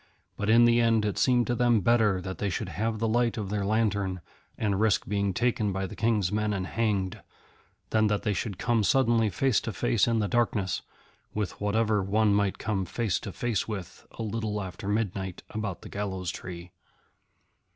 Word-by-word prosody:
But 105 - -2
in 115 +2 +7
the 120 0 +4
end 115 -2 +3
it 105 - -1
seemed 125 -2 +3
to 120 - 0
them 120 -2 +3
better 110 -3 +3
that 95 0 -6
they 100 - 0
should 95 +1 -3
have 110 +3 -2
the 115 +1 0
light 120 +1 +1
of 100 -3 -4
their 105 -1 -1
lantern, 100 -3 0 0.4
and 100 -3 0
risk 110 -2 +2
being 100 -1 0
taken 110 0 0
by 95 0 -2
the 95 - -7
King's 110 -5 +1
men 105 0 0
and 95 -2 -2
hanged, 105 -2 -1 0.7
than 110 -1 +3
that 105 -1 0
they 105 - +1
should 100 -1 -3
come 115 +1 +1
suddenly 115 -3 +3
face 130 +1 +1
to - - -4
face - - +1
in 115 -1 +2
the 105 -2 +1
darkness 110 -6 0 0.5
with 105 -3 -3
whatever 105 0 +2
one 105 +2 +2
might 100 -1 +1
come 105 -3 -1
face 105 +1 -1
to 100 - -6
face 120 -2 -1
with 100 -6 -7
a - - -5
little 110 -1 -2
after 95 0 -6
midnight 100 -3 -2
about 105 -4 -4
the - - -8
Gallows 95 -3 -3
Tree. 90 -1 -8
105 Hz, 195 wpm, -28 LUFS, 100-115 Hz, 0.7 s, in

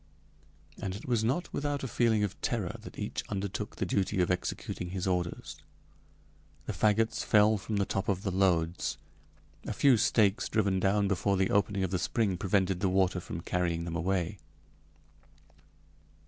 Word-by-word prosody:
And 95 -1 -3
it 100 - -9
was 120 -3 +1
not 135 +11 -1
without 145 -1 -2
a - - -2
feeling 110 -2 +2
of 105 - -4
terror - - -1
that - - -11
each - - -3
undertook 100 +1 -4
the - - -2
duty 95 +2 0
of 90 0 +2
executing 90 0 -3
his 95 +1 -3
orders. 90 -2 -2 1.1
The - - -3
fagots 110 +1 +2
fell 105 0 +4
from 105 +3 -4
the 100 - +2
top 95 +1 -2
of 95 -1 0
the 95 - -1
loads. 90 -3 +1 0.7
A - - -2
few 135 -4 +5
stakes 105 +1 +2
driven 100 -4 +1
down 100 +1 +2
before 100 0 +1
the 95 0 +1
opening 100 -1 +1
of 95 - -1
the 95 - 0
spring 105 -3 0
prevented 95 0 +1
the 95 -1 +1
water 95 -1 +2
from 85 -1 -6
carrying 85 -1 -1
them 85 -1 -4
away. 90 +2 -1
95 Hz, 165 wpm, -30 LUFS, 90-105 Hz, 1.1 s, few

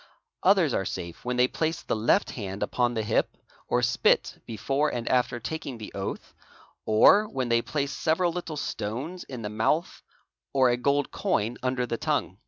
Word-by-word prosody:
Others 185 -8 +4
are - - +1
safe 85 -2 -6
when 125 0 -2
they 125 0 +5
place 160 +5 -2
the - - -1
left 110 +2 +2
hand 100 -3 -4
upon 120 -1 0
the 110 - 0
hip, 110 - 0 0.3
or - - +1
spit - - +2
before 135 +7 0
and 120 -1 -4
after 125 -1 +1
taking 130 +1 -5
the 110 - -8
oath, - - -5 0.5
or 200 - +6
when 130 -2 -2
they 115 0 +3
place 140 +2 -2
several 170 +4 +1
little 165 -3 -5
stones 130 - -4
in 125 -4 -7
the; 105 - -3
'mouth 115 +10 0 0.5
or 130 -2 +5
a - - +2
gold 140 +3 +1
coin 115 +4 -1
under 130 -1 0
the 115 -1 -3
tongue. - - -1
125 Hz, 180 wpm, -27 LUFS, 115-150 Hz, 0.5 s, or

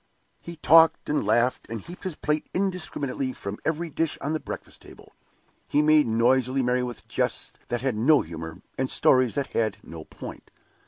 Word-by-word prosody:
He 170 - -8
talked 165 +1 +5
and 150 - +1
laughed, 120 +4 +1
and 115 0 -4
heaped 175 - -11
his 185 -4 -3
plate 150 0 -2
indiscriminately 155 -9 -2
from 100 -2 -6
every 165 +2 -1
dish 165 +1 -1
on 145 +3 -2
the 155 - -1
breakfast - - -8
table. - - -15 0.5
He 150 - +2
made 155 -2 +5
noisily 130 +3 +2
merry 125 +1 +1
with 125 -2 -6
jests - - -2
that 120 - -2
had 130 -3 0
no 140 +7 +4
humor, 80 0 -8 0.2
and 130 0 0
stories 130 -2 +3
that 140 -1 -2
had 110 -3 0
no 80 -1 -9
point. - - -10
130 Hz, 175 wpm, -26 LUFS, 115-155 Hz, 0.5 s, talked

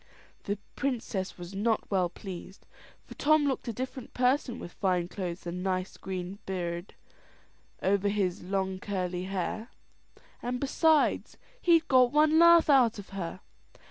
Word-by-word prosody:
The 205 +1 -1 0.2
princess 230 -8 -2
was 175 +1 -8
not 215 +3 0
well 185 -3 +2
pleased, 190 0 -9 0.4
for - - -11
Tom 310 0 +3
looked 270 -3 -1
a - - 0
different 255 +2 -6
person 250 0 +1
with 180 - -8
fine 180 -3 0
clothes 180 -2 -5
and 175 +1 -4
a - - -5
nice 185 0 -2
green 185 +1 -5
birredh 175 -1 -4 0.9
over 200 +1 +2
his 195 -3 0
long 190 0 -2
curly 185 -2 -3
hair; 195 +5 -3 0.7
and 245 +1 -2
besides, 305 +3 +2 0.2
he'd 330 -2 +4
got 255 -2 +5
one 305 +1 +4
laugh 340 -1 +7
out 255 -6 +5
of 205 - -9
her. 185 -2 -5
200 Hz, 145 wpm, -29 LUFS, 185-255 Hz, 0.9 s, laugh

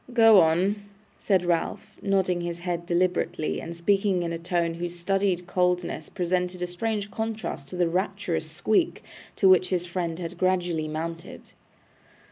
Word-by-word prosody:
'Go 225 -4 +7
on,' 175 +5 +3 0.4
said 190 -4 +2
Ralph, 175 +5 -1
nodding 190 -3 +1
his 170 0 -4
head 170 -1 -3
deliberately, 175 -3 0
and 170 +1 -7
speaking 195 +1 +2
in 170 0 -2
a 165 - -4
tone 170 -1 0
whose 175 +1 -5
studied 190 0 0
coldness 180 -3 0
presented 180 0 -1
a - - +1
strange 205 +3 -3
contrast 220 -10 -4
to 160 - -8
the 175 -1 +2
rapturous 180 -2 -2
squeak 215 - 0 0.3
to 195 - +3
which 185 -1 +5
his 180 -2 0
friend 170 -2 -3
had 175 0 -6
gradually 175 -4 +1
mounted. 165 +2 -6
180 Hz, 150 wpm, -26 LUFS, 170-190 Hz, 0.4 s, Go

